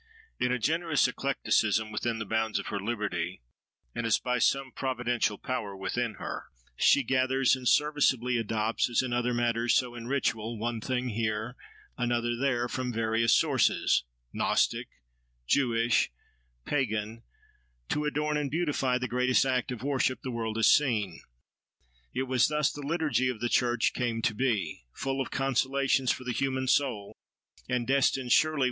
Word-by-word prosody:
In 125 Hz, -, +1 dB
a 125 Hz, -, +1 dB
generous 160 Hz, +3 st, +1 dB
eclecticism, 110 Hz, -5 st, 0 dB
within 115 Hz, +2 st, -2 dB
the 115 Hz, -, -4 dB
bounds 110 Hz, +1 st, 0 dB
of -, -, -4 dB
her 100 Hz, -, -2 dB
liberty, 115 Hz, -, -3 dB, 0.5 s
and -, -, -3 dB
as 110 Hz, -, +4 dB
by 125 Hz, -1 st, -1 dB
some 135 Hz, +2 st, +1 dB
providential 120 Hz, -5 st, -1 dB
power 105 Hz, -7 st, -4 dB
within 115 Hz, +3 st, -2 dB
her, -, -, -6 dB, 0.3 s
she 140 Hz, -, +4 dB
gathers 130 Hz, +1 st, +2 dB
and 130 Hz, -1 st, -5 dB
serviceably 135 Hz, -5 st, +2 dB
adopts, 110 Hz, 0 st, 0 dB
as 120 Hz, +2 st, +2 dB
in 125 Hz, -2 st, -3 dB
other 120 Hz, 0 st, 0 dB
matters 120 Hz, -1 st, +1 dB
so 125 Hz, -2 st, +1 dB
in 115 Hz, -1 st, -8 dB
ritual, 115 Hz, -4 st, -1 dB
one 115 Hz, +1 st, -3 dB
thing 125 Hz, 0 st, -2 dB
here, 110 Hz, +1 st, -2 dB, 0.4 s
another 120 Hz, -1 st, 0 dB
there, 120 Hz, -1 st, 0 dB
from 125 Hz, 0 st, -3 dB
various 115 Hz, 0 st, +2 dB
sources—Gnostic, -, -, +1 dB, 0.6 s
Jewish, 115 Hz, -, +2 dB, 0.5 s
Pagan—to 110 Hz, -, -4 dB
adorn 150 Hz, 0 st, 0 dB
and 145 Hz, -2 st, -1 dB
beautify 145 Hz, -5 st, 0 dB
the 125 Hz, 0 st, -3 dB
greatest 125 Hz, +1 st, +2 dB
act 130 Hz, -1 st, 0 dB
of 125 Hz, -1 st, -6 dB
worship 135 Hz, -2 st, 0 dB
the 130 Hz, -, -4 dB
world 115 Hz, -2 st, -3 dB
has 115 Hz, -, +3 dB
seen. 110 Hz, -, +2 dB, 0.9 s
It 130 Hz, -, -1 dB
was 130 Hz, -1 st, +2 dB
thus 150 Hz, -1 st, +1 dB
the 145 Hz, -, -8 dB
liturgy 150 Hz, -3 st, 0 dB
of 125 Hz, -4 st, -4 dB
the 120 Hz, -, -1 dB
church 120 Hz, -2 st, +2 dB
came 115 Hz, -3 st, -2 dB
to 110 Hz, -, +2 dB
be—full 125 Hz, -, -2 dB
of 130 Hz, -, -3 dB
consolations 135 Hz, 0 st, +1 dB
for -, -, -4 dB
the 125 Hz, -1 st, -3 dB
human 130 Hz, +1 st, -1 dB
soul, 125 Hz, -7 st, +1 dB, 0.6 s
and 125 Hz, -1 st, 0 dB
destined, 135 Hz, -1 st, +1 dB
surely! 155 Hz, -1 st, +4 dB
125 Hz, 150 wpm, -29 LUFS, 115-135 Hz, 0.9 s, as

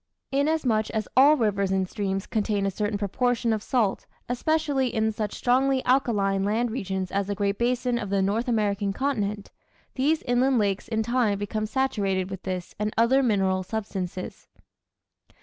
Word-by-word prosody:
Inasmuch 270 Hz, -6 st, +1 dB
as 215 Hz, -1 st, -2 dB
all 285 Hz, +4 st, +7 dB
rivers 200 Hz, -5 st, +1 dB
and 190 Hz, -1 st, +1 dB
streams 195 Hz, -1 st, -3 dB
contain 210 Hz, -2 st, -1 dB
a 195 Hz, -, 0 dB
certain 205 Hz, +2 st, -2 dB
proportion 230 Hz, +3 st, 0 dB
of 215 Hz, -, -2 dB
salt, 220 Hz, -4 st, 0 dB, 0.2 s
especially 280 Hz, +1 st, 0 dB
in 220 Hz, -2 st, 0 dB
such 210 Hz, -1 st, -4 dB
strongly 260 Hz, +1 st, +2 dB
alkaline 205 Hz, -7 st, +2 dB
land 225 Hz, +4 st, 0 dB
regions 190 Hz, -5 st, -3 dB
as 200 Hz, 0 st, -1 dB
the 205 Hz, -, -2 dB
Great 200 Hz, 0 st, -1 dB
Basin 245 Hz, 0 st, 0 dB
of 205 Hz, -, -5 dB
the 195 Hz, -1 st, +1 dB
North 215 Hz, +6 st, 0 dB
American 205 Hz, -3 st, 0 dB
continent, 210 Hz, -6 st, -2 dB, 0.4 s
these 295 Hz, +4 st, +1 dB
inland 250 Hz, +1 st, +2 dB
lakes 200 Hz, -2 st, 0 dB
in 220 Hz, -1 st, 0 dB
time 235 Hz, -3 st, +1 dB
become 215 Hz, +2 st, -3 dB
saturated 200 Hz, -7 st, -1 dB
with 190 Hz, -1 st, -6 dB
this 185 Hz, -2 st, -5 dB
and 210 Hz, 0 st, -1 dB
other 240 Hz, +4 st, +4 dB
mineral 195 Hz, -6 st, +1 dB
substances. 185 Hz, -3 st, -5 dB
215 Hz, 160 wpm, -26 LUFS, 200-250 Hz, 0.4 s, all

